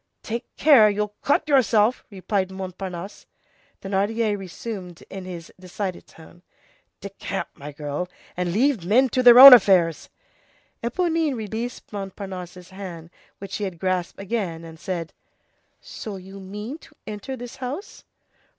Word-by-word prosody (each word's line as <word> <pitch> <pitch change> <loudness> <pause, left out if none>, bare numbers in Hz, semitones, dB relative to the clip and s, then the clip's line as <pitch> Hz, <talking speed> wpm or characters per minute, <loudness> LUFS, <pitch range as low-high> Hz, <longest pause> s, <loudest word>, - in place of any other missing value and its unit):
"Take 235 +3 -4
care, 265 -9 +6
you'll 210 0 -2
cut 285 +2 +1
yourself," 245 -5 +3
replied 195 -1 -2
Montparnasse. 190 0 -7 0.6
Thénardier 205 +3 0
resumed 190 -2 -8
in 190 -1 -7
his 175 -3 -9
decided 185 0 -5
tone:— 165 +2 -17 0.6
"Decamp, - - -5
my 145 +1 -9
girl, 145 +4 -4 0.3
and 180 -1 -1
leave 240 0 +2
men 245 +9 +3
to 255 - +1
their 245 -1 +9
own 270 +1 +14
affairs!" 180 -8 +4 0.7
Éponine 325 +3 0
released 230 +4 -6
Montparnasse's 190 -3 -7
hand, 175 -4 -9 0.3
which 195 -1 -9
she 205 - -3
had 190 -4 -4
grasped 185 0 -2
again, 190 -5 -3
and 160 -1 -11
said:— 170 -1 -4 0.7
"So 210 -2 -8
you 190 +1 -10
mean 210 +9 -7
to - - -19
enter 215 +5 -6
this 245 0 -9
house?" 270 - -6
195 Hz, 130 wpm, -23 LUFS, 180-235 Hz, 0.7 s, own